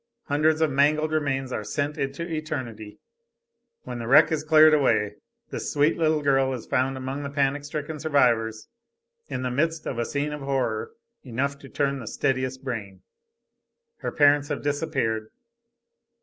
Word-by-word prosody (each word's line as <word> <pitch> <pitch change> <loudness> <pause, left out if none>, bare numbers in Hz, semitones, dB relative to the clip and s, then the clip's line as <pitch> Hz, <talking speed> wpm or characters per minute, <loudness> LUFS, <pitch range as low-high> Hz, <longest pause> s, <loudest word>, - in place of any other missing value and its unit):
Hundreds 155 +2 +2
of 160 -2 +3
mangled 150 +3 +2
remains 135 -4 -1
are 110 - -3
sent 145 +6 -2
into 140 +5 -3
eternity. 130 -10 -5 0.9
When 125 - -6
the 115 - -5
wreck 135 +6 +6
is 155 -2 0
cleared 155 0 +7
away 130 -8 +2 0.3
this - - -4
sweet 145 +2 +3
little 155 -2 +1
girl 135 -1 +2
is 125 - -6
found 130 +1 0
among 130 +2 -4
the 140 - -4
panic 140 0 0
stricken 150 +1 -5
survivors 120 -7 +1 0.6
in 130 - -4
the 125 - -1
midst 160 +4 0
of 120 - -3
a 120 - 0
scene 145 +3 -2
of 150 - -6
horror 130 -5 -1 0.3
enough 140 +3 -2
to 135 - -12
turn 140 -1 -1
the 115 - -8
steadiest 130 +1 -1
brain. 105 -7 -5 0.9
Her - - -4
parents 145 -1 +4
have 145 -2 -4
disappeared. 140 -7 -1
140 Hz, 160 wpm, -25 LUFS, 130-150 Hz, 0.9 s, cleared